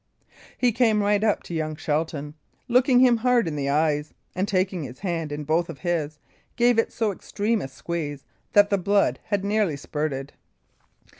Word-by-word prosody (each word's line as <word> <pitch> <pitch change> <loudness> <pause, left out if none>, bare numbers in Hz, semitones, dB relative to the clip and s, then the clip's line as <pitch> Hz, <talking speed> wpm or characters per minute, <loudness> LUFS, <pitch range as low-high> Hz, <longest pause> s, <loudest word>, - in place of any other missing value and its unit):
He 250 -1 +3
came 220 -3 +2
right 205 0 +2
up 215 -2 +1
to - - -8
young 155 -1 -2
Shelton, 150 -1 -2 0.3
looking 250 +1 +4
him 245 -2 +5
hard 240 -2 +2
in 155 - -3
the 140 -1 -2
eyes, 150 0 0 0.2
and 185 +2 -1
taking 185 -2 0
his 130 -3 -8
hand 165 -5 -2
in 150 +1 -4
both 160 +3 0
of - - -7
his, 160 -4 -1 0.4
gave 240 -1 +3
it - - +1
so 225 -3 0
extreme 210 +3 -2
a - - -4
squeeze 145 0 -5 0.3
that 205 0 +5
the 200 - +2
blood 200 +2 +2
had 200 -1 -1
nearly 205 -7 +1
spurted. 140 -1 -4
175 Hz, 175 wpm, -24 LUFS, 150-210 Hz, 0.4 s, him